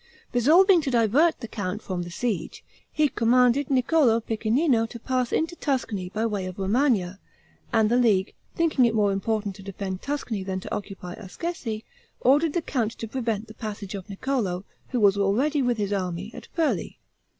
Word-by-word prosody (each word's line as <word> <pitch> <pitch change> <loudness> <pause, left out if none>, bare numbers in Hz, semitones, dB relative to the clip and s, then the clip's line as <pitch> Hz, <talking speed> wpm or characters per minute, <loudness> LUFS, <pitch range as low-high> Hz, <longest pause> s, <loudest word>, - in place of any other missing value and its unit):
Resolving 335 - +5
to 285 - -2
divert 250 +8 +3
the 230 - -5
count 205 -1 -4
from 185 -2 -3
the 175 - -6
siege, 205 +1 -3 0.3
he 305 -1 +3
commanded 250 +2 +3
Niccolo 260 -2 +3
Piccinino 225 +3 +1
to 235 - -8
pass 255 0 -1
into 325 +2 0
Tuscany 225 - -2
by 215 +4 -1
way 205 -4 -2
of 185 - -7
Romagna; 195 -2 +1 0.5
and 220 -3 +4
the 240 +3 +2
League, 210 -6 +2 0.2
thinking 315 -6 +3
it 230 -1 +1
more 205 -2 +3
important 205 0 -1
to - - -11
defend 195 -1 -5
Tuscany 280 -8 -3
than 190 0 -3
to - - -6
occupy 195 -3 -7
Ascesi, 225 - -5 0.4
ordered 290 +4 +3
the 345 - -1
count 230 -7 -1
to 225 - -7
prevent 225 -3 -2
the 220 - -11
passage 210 -3 -6
of 195 0 -7
Niccolo, 200 -4 -2 0.2
who 250 - -1
was 200 -2 +4
already, 255 +10 +2
with 245 -2 +1
his 205 -1 -1
army, 185 +1 -3
at - - -10
Furli. 325 -2 0
225 Hz, 175 wpm, -25 LUFS, 200-260 Hz, 0.5 s, Resolving